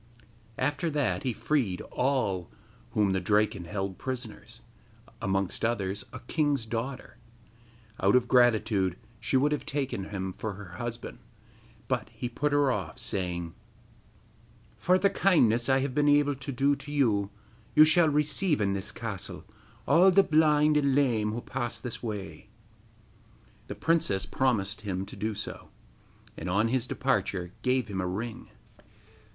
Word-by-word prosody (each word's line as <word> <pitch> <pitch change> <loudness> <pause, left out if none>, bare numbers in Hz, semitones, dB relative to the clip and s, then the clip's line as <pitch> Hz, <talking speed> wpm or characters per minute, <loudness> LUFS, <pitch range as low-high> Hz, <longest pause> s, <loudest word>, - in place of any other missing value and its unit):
After 145 +3 0
that 130 - 0
he 130 - -1
freed 115 -7 0
all 125 -10 0 0.4
whom 105 -2 +2
the 95 - +1
Draken 105 0 +1
held 95 +1 -4
prisoners, 120 -2 -6 0.6
amongst 95 -1 -1
others, 105 -4 -1
a - - -9
king's 145 -1 0
daughter. 120 +3 -5 0.8
Out 100 +4 +3
of 125 -1 +3
gratitude 110 -7 +3 0.2
she 130 +4 +1
would 145 +3 +2
have 150 - -1
taken 135 -9 -3
him 95 -2 -4
for 110 +2 -4
her 95 -3 -10
husband; 120 -1 -6 0.7
but - - -1
he 125 - -5
put 145 +5 -1
her 145 -2 +3
off, 95 -9 -4
saying: 85 -3 -3 1.2
'For 180 +1 +3
the 195 +1 +2
kindness 120 - +3
that 135 - +4
I - - +3
have 135 -1 -2
been 145 +1 +3
able 145 0 +4
to 135 0 -6
do 140 +3 +2
to 140 +1 -9
you, 110 -9 +2 0.5
you 155 - +9
shall 155 +1 +5
receive 150 +3 +1
in 100 -2 +1
this 95 -1 -2
castle - - -5 0.4
all 180 +3 +6
the 195 +1 +5
blind 150 -2 +4
and 140 -2 +2
lame 115 -7 +2
who 115 +2 -4
pass 120 -1 -3
this 125 -3 -6
way.' 105 -5 -6 1.2
The - - -6
princess 160 - +1
promised 110 -5 0
him 95 -2 -3
to - - -11
do 110 0 -3
so, - - -6 0.7
and 90 - -5
on 105 +5 +2
his 130 0 0
departure 95 -10 -1
gave 125 -3 +1
him 95 -3 -3
a 90 - -2
ring. 110 +5 -5
120 Hz, 150 wpm, -28 LUFS, 100-140 Hz, 1.2 s, you